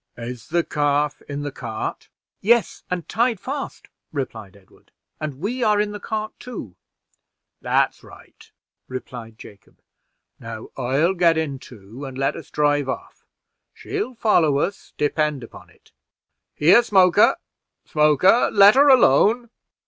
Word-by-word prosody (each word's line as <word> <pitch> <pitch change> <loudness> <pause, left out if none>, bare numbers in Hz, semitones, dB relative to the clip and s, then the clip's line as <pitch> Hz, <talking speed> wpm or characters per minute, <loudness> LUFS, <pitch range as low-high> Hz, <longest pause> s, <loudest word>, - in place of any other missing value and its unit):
Is 120 -1 -8
the 170 -1 +1
calf 145 -1 0
in 145 0 -4
the 145 - -4
cart?" 110 -4 -6 0.3
"Yes, 230 -1 +2
and 180 -2 -4
tied 235 -2 0
fast," 275 +5 -6 0.2
replied 110 -9 -6
Edward, 95 -2 -25 0.3
"and 150 -4 -5
we 235 - -3
are 210 -2 +3
in 210 0 0
the 205 - -7
cart, 215 +1 -4
too." 200 - -8 0.9
"That's - - 0
right," - - -17 0.4
replied 120 -3 -8
Jacob. 100 -2 -16 0.6
"Now 115 -1 -8
I'll 135 +8 +1
get 170 -3 +3
in 145 -4 -2
too, 115 +2 -12
and 135 -2 -7
let 135 0 0
us - - -10
drive 145 -2 +1
off. - - -7 0.5
She'll 405 -11 -5
follow 170 -11 +2
us, 195 +7 -3
depend 150 -2 0
upon 115 - -13
it. - - -26 0.6
Here, 175 +10 +6
Smoker! 190 -6 +4 0.5
Smoker! 150 - +3
let 200 0 +7
her 280 +2 +5
alone." 235 - +4
150 Hz, 135 wpm, -22 LUFS, 130-210 Hz, 0.9 s, let